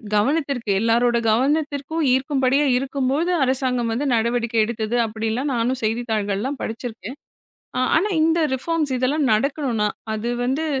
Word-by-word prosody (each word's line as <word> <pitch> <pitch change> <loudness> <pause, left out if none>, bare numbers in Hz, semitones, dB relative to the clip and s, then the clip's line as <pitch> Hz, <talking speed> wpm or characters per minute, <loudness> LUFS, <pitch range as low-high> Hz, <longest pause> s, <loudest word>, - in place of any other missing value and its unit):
கவனத்திற்கு 270 +1 0
எல்லாரோட 235 +2 +2
கவனத்திற்கும் 290 +5 0
ஈர்க்கும்படியா 270 +1 +2
இருக்கும்போது, 275 +5 -1
அரசாங்கம் 255 -3 0
வந்து 280 +5 -2
நடவடிக்கை 235 0 0
எடுத்தது 225 0 -3
அப்பிடின்லாம் 225 +5 -2
நானும் 245 +2 -1
செய்தித்தாள்கள்லாம் 220 +2 -1
படிச்சிருக்கேன். 230 +2 -6 0.8
ஆனா, 400 +6 +1
இந்த 325 +1 +2
ரிஃபார்ம்ஸ் 300 +2 -1
இதெல்லாம் 280 +4 +1
நடக்கணுன்னா, 245 -3 0 0.3
அது 235 +3 -3
வந்து 275 +6 -1
255 Hz, 110 wpm, -22 LUFS, 230-285 Hz, 0.8 s, எல்லாரோட